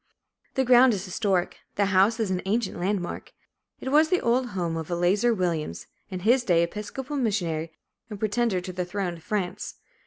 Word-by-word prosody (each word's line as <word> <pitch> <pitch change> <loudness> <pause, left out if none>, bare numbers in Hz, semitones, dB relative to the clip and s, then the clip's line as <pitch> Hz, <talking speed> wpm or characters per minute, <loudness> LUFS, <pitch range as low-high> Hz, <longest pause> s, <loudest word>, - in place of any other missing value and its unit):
The 265 - +2
ground 245 -1 +6
is 190 -1 -5
historic. 185 -1 -1 0.2
The 200 - +2
house 200 +5 +4
is 215 -4 0
an 185 -1 0
ancient 215 -2 -1
landmark. 185 0 -3 0.5
It 265 - -4
was 310 +2 +5
the 365 - +3
old 245 +1 +1
home 175 -6 -2
of 160 -2 -5
Eleazar 180 +7 +2
Williams, 165 - -2 0.2
in 185 -2 -5
his 240 +6 +4
day 170 -6 +3
Episcopal 230 - -4
missionary 170 - -1 0.4
and 210 - -6
pretender 215 -2 0
to 185 +1 -7
the 180 0 -2
throne 180 0 -3
of 165 - -17
France. 195 -4 -3
200 Hz, 180 wpm, -26 LUFS, 175-235 Hz, 0.5 s, ground